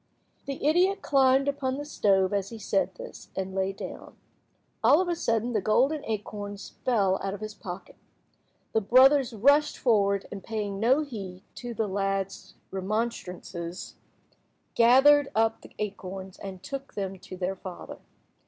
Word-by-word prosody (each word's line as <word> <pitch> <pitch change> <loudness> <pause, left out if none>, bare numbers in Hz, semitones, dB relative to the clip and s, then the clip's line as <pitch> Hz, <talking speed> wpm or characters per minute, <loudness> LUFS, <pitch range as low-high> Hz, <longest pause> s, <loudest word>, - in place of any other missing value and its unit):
The 275 0 -4
idiot 365 +6 +3
climbed 270 0 +4
upon 270 -2 -1
the 290 - -5
stove 195 -9 +2
as 200 -1 -1
he 230 - -8
said 195 -3 0
this, - - -10
and 190 0 -3
lay 190 0 0
down. 195 - -9 0.7
All 300 - +6
of 370 - +1
a 345 - 0
sudden 230 -5 0
the 210 - +1
golden 270 +9 +2
acorns 205 -2 -5
fell 200 -7 +2
out 195 0 -2
of - - -9
his 215 0 -6
pocket. 185 -2 -9 0.8
The 220 - +3
brothers 260 +5 +5
rushed 285 +7 +4
forward, 200 -5 +2
and 195 -2 -7
paying 205 -3 -3
no 255 +7 +4
heed 195 -9 -8
to 240 -1 -6
the 220 - 0
lad's 195 -1 -2 0.2
remonstrances, 190 -4 -4 0.8
gathered 270 +5 +6
up 225 0 +2
the - - -15
acorns 190 -2 -6
and 190 -2 -8
took 275 +7 -7
them 195 -2 -4
to 185 - -10
their 185 +1 -2
father. 185 -1 -9
210 Hz, 155 wpm, -27 LUFS, 195-260 Hz, 0.8 s, All